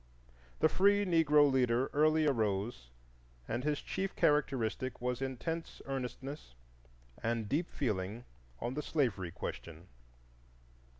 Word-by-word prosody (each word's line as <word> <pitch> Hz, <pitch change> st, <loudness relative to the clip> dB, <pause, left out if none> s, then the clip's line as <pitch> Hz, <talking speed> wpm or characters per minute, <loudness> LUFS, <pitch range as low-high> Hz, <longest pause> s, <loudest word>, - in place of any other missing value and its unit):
The -, -, +7 dB
free 200 Hz, +4 st, +3 dB
Negro 150 Hz, -5 st, +5 dB
leader 125 Hz, -1 st, +2 dB
early 155 Hz, +1 st, +4 dB
arose 105 Hz, -, 0 dB, 0.6 s
and 125 Hz, -, -2 dB
his 150 Hz, 0 st, -1 dB
chief 195 Hz, 0 st, -3 dB
characteristic 130 Hz, -3 st, +1 dB
was 125 Hz, +1 st, -2 dB
intense 160 Hz, +6 st, -4 dB
earnestness 135 Hz, -, -5 dB, 0.7 s
and 115 Hz, -1 st, -1 dB
deep 160 Hz, +10 st, 0 dB
feeling 110 Hz, -2 st, -2 dB, 0.3 s
on 120 Hz, -, -3 dB
the 150 Hz, -, -2 dB
slavery 120 Hz, -, 0 dB
question. 85 Hz, 0 st, -7 dB
130 Hz, 110 wpm, -33 LUFS, 115-150 Hz, 0.7 s, The